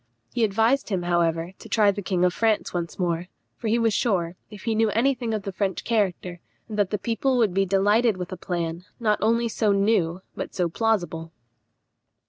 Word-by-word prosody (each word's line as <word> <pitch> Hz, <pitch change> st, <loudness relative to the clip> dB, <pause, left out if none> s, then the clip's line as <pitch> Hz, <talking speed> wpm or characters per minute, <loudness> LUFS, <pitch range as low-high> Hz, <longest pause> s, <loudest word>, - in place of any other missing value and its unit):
He 240 Hz, -, +1 dB
advised 225 Hz, +6 st, +2 dB
him, 190 Hz, -4 st, -1 dB
however, 170 Hz, -1 st, +1 dB
to -, -, -12 dB
try 210 Hz, -2 st, +4 dB
the 205 Hz, +1 st, -5 dB
king 180 Hz, -2 st, +1 dB
of 180 Hz, -, +2 dB
France 220 Hz, +1 st, +1 dB
once 170 Hz, -2 st, -3 dB
more; 175 Hz, -1 st, -1 dB, 0.3 s
for 230 Hz, -, -5 dB
he 220 Hz, +2 st, +3 dB
was 230 Hz, -2 st, +2 dB
sure, 185 Hz, -7 st, 0 dB
if 210 Hz, -2 st, -11 dB
he 225 Hz, -, 0 dB
knew 220 Hz, 0 st, +2 dB
any 240 Hz, +6 st, +2 dB
thing 240 Hz, -3 st, -4 dB
of 215 Hz, -2 st, -2 dB
the 195 Hz, -, -4 dB
French 190 Hz, -1 st, -2 dB
character, 185 Hz, -5 st, -1 dB, 0.3 s
that 210 Hz, -3 st, 0 dB
the 210 Hz, -, -1 dB
people 240 Hz, +5 st, 0 dB
would 220 Hz, -6 st, +2 dB
be 195 Hz, +1 st, +2 dB
delighted 205 Hz, +3 st, +3 dB
with 180 Hz, +1 st, -5 dB
a -, -, -3 dB
plan, 170 Hz, -1 st, -3 dB, 0.2 s
not 215 Hz, -3 st, +1 dB
only 230 Hz, +2 st, +2 dB
so 220 Hz, -2 st, +1 dB
new, 195 Hz, -3 st, +1 dB
but -, -, -6 dB
so 175 Hz, -2 st, +1 dB
plausible. 175 Hz, -5 st, -1 dB
200 Hz, 200 wpm, -25 LUFS, 180-225 Hz, 0.3 s, try